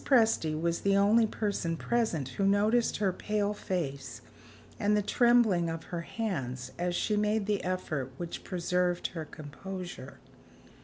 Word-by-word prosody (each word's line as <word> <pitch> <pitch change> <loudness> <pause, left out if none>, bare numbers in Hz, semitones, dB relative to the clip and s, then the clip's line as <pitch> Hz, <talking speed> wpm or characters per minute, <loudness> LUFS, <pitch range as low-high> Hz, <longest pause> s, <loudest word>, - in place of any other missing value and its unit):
Presty 220 - +3
was 170 +1 0
the 200 0 +3
only 215 +3 +5
person 200 -6 -2
present 215 - 0
who 195 - -3
noticed 215 +4 +3
her 195 -3 +1
pale 210 +1 -1
face 140 - -4 0.6
and 210 +1 +3
the 210 - +1
trembling 225 -7 +4
of 165 0 -4
her 170 -1 -4
hands 130 - -4
as 175 0 0
she 210 - +1
made 210 0 +1
the 205 -1 0
effort 155 -8 -2
which 170 -1 -5
preserved 180 0 0
her 160 -3 -6
composure. 155 -1 -8
185 Hz, 145 wpm, -30 LUFS, 165-210 Hz, 0.6 s, only